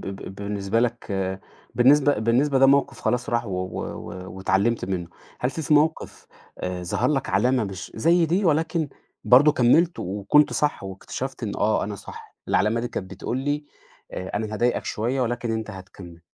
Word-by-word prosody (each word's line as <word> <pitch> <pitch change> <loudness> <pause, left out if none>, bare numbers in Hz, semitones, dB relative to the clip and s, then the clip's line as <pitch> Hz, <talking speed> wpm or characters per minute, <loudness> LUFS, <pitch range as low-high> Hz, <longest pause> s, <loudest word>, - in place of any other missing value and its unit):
ب 95 0 -7
بالنسبة 100 +2 -2
لك، 120 0 -1 0.7
بالنسبة 140 +1 +4
بالنسبة 130 +5 +2
ده 135 - +6
موقف 140 0 +2
خلاص 125 -1 -1
راح، 120 0 0
و - - -6
و 90 0 -3
و 95 +1 -8
واتعلمت 100 +5 +1
منّه. 90 -3 -3 0.3
هل 125 - 0
في 155 0 0
موقف 155 +2 0 0.3
آآ 90 -1 -4
ظهر 110 +8 0
لك 135 -2 -1
علامة 120 +5 +2
مش 95 -2 -7
زي 165 +8 +3
دي، 180 +5 +1
ولكن 160 0 +1 0.4
برضو 140 +5 +6
كملت 155 +6 +3
وكنت 100 +10 +2
صح، 150 -8 0
واكتشفت 115 +7 -6
إنّه 105 - -3
آه 105 +1 +2
أنا 105 0 -5
صح. - - -12
العلامة 110 +4 +2
دي 120 - -3
كانت 95 -4 -6
بتقول 105 +6 -4
لي 145 +2 -2 0.5
آآ 95 - -5
أنا 110 0 -3
هاضايقك 120 +3 0
شويّة، 120 +5 -1
ولكن 120 -1 -1
أنت 110 -1 -3
هتكمل. 95 -3 -11
115 Hz, 170 wpm, -24 LUFS, 95-140 Hz, 0.7 s, ده